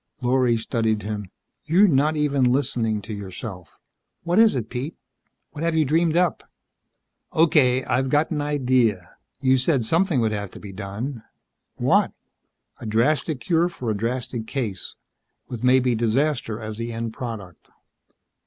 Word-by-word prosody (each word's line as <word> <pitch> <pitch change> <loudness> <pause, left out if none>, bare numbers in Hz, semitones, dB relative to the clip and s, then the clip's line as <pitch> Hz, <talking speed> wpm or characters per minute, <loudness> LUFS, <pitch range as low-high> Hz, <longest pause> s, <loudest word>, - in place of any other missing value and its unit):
Lorry 125 -1 +2
studied 110 -2 -1
him. 105 -2 -5 0.3
"You're 180 +7 +5
not 150 -1 +2
even 140 -4 +2
listening 120 -6 0
to 110 - -6
yourself. 95 -2 -8 0.5
What 175 +4 +2
is 225 -6 +6
it, 115 -4 -2
Pete? 130 +7 -5 0.6
What 155 0 -6
have 165 -1 +1
you 155 -1 +3
dreamed 165 +3 +2
up?" 180 -2 +2 0.9
"Okay. 150 -6 +4
I've 130 +2 0
got 150 +4 +2
an 150 -2 -1
idea. 125 - +1 0.3
You 130 -1 +4
said 130 -2 +1
something 165 - +2
would 110 -2 +1
have 100 -2 -3
to - - -12
be 100 - -9
done." 105 +6 -5 0.5
"What?" - - +2 0.7
"A 115 - -7
drastic 130 +6 +1
cure 175 -1 +2
for 125 -9 -4
a - - -1
drastic 115 +1 -3
case. 110 -9 -4 0.5
With 120 -1 -7
maybe 125 -1 +4
disaster 120 0 0
as 110 -1 -6
the 115 0 -3
end 115 0 -4
product." 110 - -8
125 Hz, 150 wpm, -23 LUFS, 110-150 Hz, 0.9 s, is